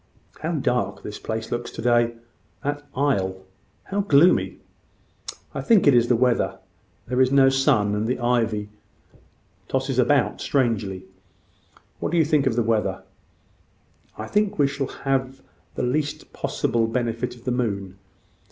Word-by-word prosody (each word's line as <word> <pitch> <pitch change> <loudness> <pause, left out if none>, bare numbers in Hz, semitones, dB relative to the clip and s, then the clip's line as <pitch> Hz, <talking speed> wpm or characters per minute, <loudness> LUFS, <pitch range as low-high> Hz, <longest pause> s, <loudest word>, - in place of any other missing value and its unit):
How 160 +2 -2
dark 125 -5 -1
this 105 - -7
place 110 0 -4
looks 120 0 -3
to - - -10
day! 120 -1 +3 0.5
that 145 +1 -2
aisle 95 -9 0 0.4
how 200 - -3
gloomy!" 175 -1 +4 1.0
"I - - -3
think 225 -5 +4
it 145 - +6
is 120 -1 +4
the 120 - +3
weather. 125 0 +1 0.5
There 125 +2 0
is 130 0 +3
no 135 -1 +6
sun; 135 -6 +2
and 105 +2 -1
the 125 - 0
ivy 115 -4 0 1.0
tosses - - -1
about - - +2
strangely. 105 -8 0 0.9
What - - -2
do 175 - +1
you 160 - +4
think 150 -3 +2
of 120 - +1
the 120 - +2
weather?" 110 -1 0 1.1
"I 110 - -5
think 210 - 0
we 145 - +4
shall 140 -1 -2
have 135 -1 -2 0.4
the - - -2
least 145 +4 -2
possible 115 -1 0
benefit 120 +1 -2
of 120 - -17
the 125 - -1
moon. 100 -6 -2
125 Hz, 150 wpm, -23 LUFS, 115-140 Hz, 1.1 s, it